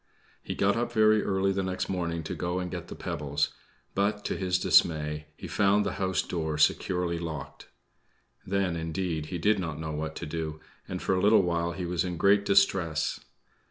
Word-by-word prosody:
He -, -, -5 dB
got 100 Hz, +1 st, +2 dB
up 120 Hz, +1 st, -1 dB
very 110 Hz, -2 st, +4 dB
early 95 Hz, 0 st, +1 dB
the 95 Hz, 0 st, 0 dB
next 95 Hz, -1 st, -2 dB
morning 85 Hz, -3 st, -2 dB
to -, -, -4 dB
go 90 Hz, 0 st, -2 dB
and 90 Hz, -1 st, -3 dB
get 85 Hz, -1 st, -5 dB
the -, -, -8 dB
pebbles; 75 Hz, -5 st, -1 dB, 0.4 s
but, 100 Hz, +1 st, 0 dB
to -, -, -1 dB
his 90 Hz, -1 st, 0 dB
dismay, 75 Hz, -4 st, +2 dB
he -, -, -7 dB
found 100 Hz, +1 st, +3 dB
the 100 Hz, -, 0 dB
house 95 Hz, -1 st, +1 dB
door 80 Hz, -3 st, -2 dB
securely 85 Hz, +2 st, +1 dB
locked. 75 Hz, -5 st, -6 dB, 0.8 s
Then, 95 Hz, -2 st, 0 dB
indeed, 80 Hz, -1 st, -2 dB
he 90 Hz, -, -4 dB
did 105 Hz, +4 st, +2 dB
not 80 Hz, -4 st, -4 dB
know 80 Hz, 0 st, -4 dB
what 80 Hz, +1 st, -4 dB
to -, -, -5 dB
do, 80 Hz, 0 st, -4 dB, 0.3 s
and -, -, -5 dB
for -, -, +1 dB
a 90 Hz, -, +1 dB
little 105 Hz, 0 st, +5 dB
while 85 Hz, -1 st, 0 dB
he 90 Hz, 0 st, -4 dB
was 85 Hz, 0 st, 0 dB
in 90 Hz, -2 st, -3 dB
great 100 Hz, +2 st, +4 dB
distress. 90 Hz, -5 st, +2 dB
90 Hz, 195 wpm, -28 LUFS, 80-95 Hz, 0.8 s, little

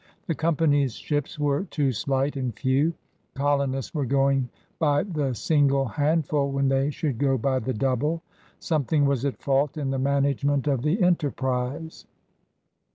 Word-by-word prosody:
The 170 Hz, -, -1 dB
company's 145 Hz, -4 st, +1 dB
ships 145 Hz, -1 st, -3 dB
were 145 Hz, +4 st, 0 dB
too 145 Hz, -7 st, 0 dB
slight 135 Hz, +4 st, -1 dB
and 130 Hz, -4 st, -3 dB
few; 140 Hz, +5 st, +1 dB, 0.4 s
colonists 140 Hz, -2 st, 0 dB
were 145 Hz, -5 st, -1 dB
going 135 Hz, -1 st, +2 dB, 0.3 s
by 145 Hz, -2 st, +2 dB
the 150 Hz, -10 st, -2 dB
single 140 Hz, 0 st, +2 dB
hand 150 Hz, +6 st, +1 dB
ful 140 Hz, -1 st, 0 dB
when 135 Hz, 0 st, +1 dB
they 135 Hz, +1 st, +2 dB
should 145 Hz, -4 st, -3 dB
go 135 Hz, -2 st, +2 dB
by 130 Hz, +2 st, 0 dB
the 130 Hz, +1 st, -3 dB
double. 135 Hz, +8 st, 0 dB, 0.3 s
Some 155 Hz, -4 st, 0 dB
thing 145 Hz, +2 st, +2 dB
was 140 Hz, -2 st, +1 dB
at 140 Hz, -, -2 dB
fault 140 Hz, +2 st, 0 dB
in 140 Hz, -3 st, -2 dB
the 135 Hz, -, -1 dB
management 140 Hz, 0 st, +1 dB
of 140 Hz, -4 st, +1 dB
the 155 Hz, -, +1 dB
enter 175 Hz, -5 st, +2 dB
prise. 130 Hz, +5 st, -4 dB
140 Hz, 160 wpm, -25 LUFS, 135-150 Hz, 0.4 s, going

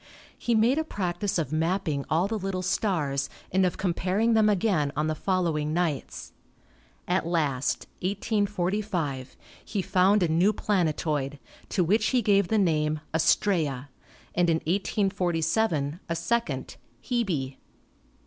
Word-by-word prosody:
He 235 Hz, -, 0 dB
made 235 Hz, +7 st, +3 dB
a -, -, +1 dB
practice 190 Hz, -, -2 dB
of 155 Hz, -5 st, -2 dB
map 165 Hz, +5 st, 0 dB
ping 145 Hz, -4 st, -2 dB
all 165 Hz, +5 st, +2 dB
the 220 Hz, +1 st, -2 dB
little 190 Hz, -1 st, -3 dB
stars 160 Hz, -8 st, 0 dB, 0.2 s
and 190 Hz, 0 st, +3 dB
of 180 Hz, -, -4 dB
comparing 190 Hz, +5 st, +1 dB
them 220 Hz, -1 st, +4 dB
again 185 Hz, -8 st, +1 dB
on 150 Hz, +1 st, 0 dB
the 155 Hz, -, 0 dB
following 160 Hz, -3 st, 0 dB
nights. 165 Hz, -6 st, -2 dB, 0.7 s
At 180 Hz, -1 st, 0 dB
last 145 Hz, -6 st, 0 dB
(1845) 190 Hz, -, -1 dB, 0.4 s
ne 200 Hz, -, +2 dB
found 190 Hz, +3 st, +3 dB
a -, -, +3 dB
new 175 Hz, +6 st, +3 dB
planetoid, 155 Hz, -8 st, 0 dB, 0.3 s
to 180 Hz, -, +1 dB
which 215 Hz, +6 st, +2 dB
he 250 Hz, -2 st, +2 dB
gave 200 Hz, -2 st, +3 dB
the 220 Hz, -, +1 dB
name 155 Hz, -5 st, +1 dB
Astraea, 155 Hz, -4 st, +1 dB, 0.4 s
and 175 Hz, -1 st, +2 dB
in 160 Hz, -, +3 dB
1847 175 Hz, -3 st, 0 dB
a 165 Hz, -, 0 dB
second, 230 Hz, +8 st, -2 dB, 0.2 s
Hebe. 175 Hz, -, -2 dB
180 Hz, 135 wpm, -27 LUFS, 155-205 Hz, 0.7 s, them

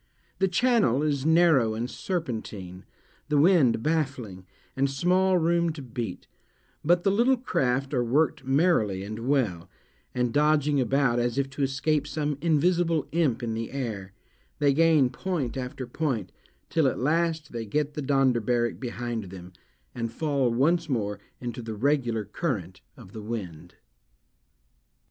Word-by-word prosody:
The 190 Hz, -, +3 dB
channel 190 Hz, -, +2 dB
is 145 Hz, -1 st, 0 dB
narrow 160 Hz, -9 st, +4 dB
and 115 Hz, +2 st, -2 dB
serpentine, 110 Hz, -, -5 dB, 0.4 s
the 150 Hz, -, +2 dB
wind 145 Hz, -8 st, +4 dB
baffling, 130 Hz, -, -2 dB, 0.3 s
and 135 Hz, +1 st, +1 dB
small 180 Hz, +6 st, +2 dB
room 170 Hz, 0 st, +2 dB
to 150 Hz, -, -8 dB
beat; 115 Hz, -6 st, -5 dB, 0.6 s
but 175 Hz, +3 st, +3 dB
the 195 Hz, -, +3 dB
little 240 Hz, +6 st, +3 dB
craft 135 Hz, -, -1 dB
are 125 Hz, -3 st, +2 dB
worked 140 Hz, +5 st, +1 dB
merrily 135 Hz, -, +2 dB
and 110 Hz, +2 st, -6 dB
well; 110 Hz, -12 st, 0 dB, 0.5 s
and 125 Hz, -1 st, 0 dB
dodging 150 Hz, -1 st, +3 dB
about, 130 Hz, -1 st, +2 dB
as 120 Hz, 0 st, -1 dB
if 135 Hz, -1 st, -1 dB
to 140 Hz, -, -6 dB
escape 140 Hz, +2 st, 0 dB
some 150 Hz, -1 st, -2 dB
invisible 170 Hz, 0 st, +2 dB
imp 150 Hz, -7 st, +1 dB
in 115 Hz, -1 st, -2 dB
the 115 Hz, 0 st, -4 dB
air, 110 Hz, -8 st, -5 dB, 0.4 s
they 145 Hz, -1 st, +3 dB
gain 155 Hz, -4 st, +4 dB
point 145 Hz, -4 st, -3 dB
after 130 Hz, 0 st, -5 dB
point, 120 Hz, -, -2 dB, 0.4 s
till 160 Hz, -4 st, +3 dB
at -, -, -1 dB
last 160 Hz, +2 st, 0 dB
they 115 Hz, -2 st, -5 dB
get 150 Hz, +6 st, -1 dB
the 150 Hz, -, -4 dB
Donderbarrak 125 Hz, -4 st, +1 dB
behind 120 Hz, -3 st, -4 dB
them, 90 Hz, -1 st, -11 dB, 0.4 s
and 115 Hz, -1 st, -3 dB
fall 140 Hz, -1 st, 0 dB
once 160 Hz, +7 st, +1 dB
more 105 Hz, -6 st, -1 dB, 0.2 s
into 120 Hz, 0 st, -5 dB
the 110 Hz, -1 st, -6 dB
regular 120 Hz, -3 st, 0 dB
current 100 Hz, -, -4 dB, 0.2 s
of 95 Hz, -, -14 dB
the 110 Hz, -, -7 dB
wind. 90 Hz, -7 st, -6 dB
135 Hz, 145 wpm, -26 LUFS, 115-155 Hz, 0.6 s, narrow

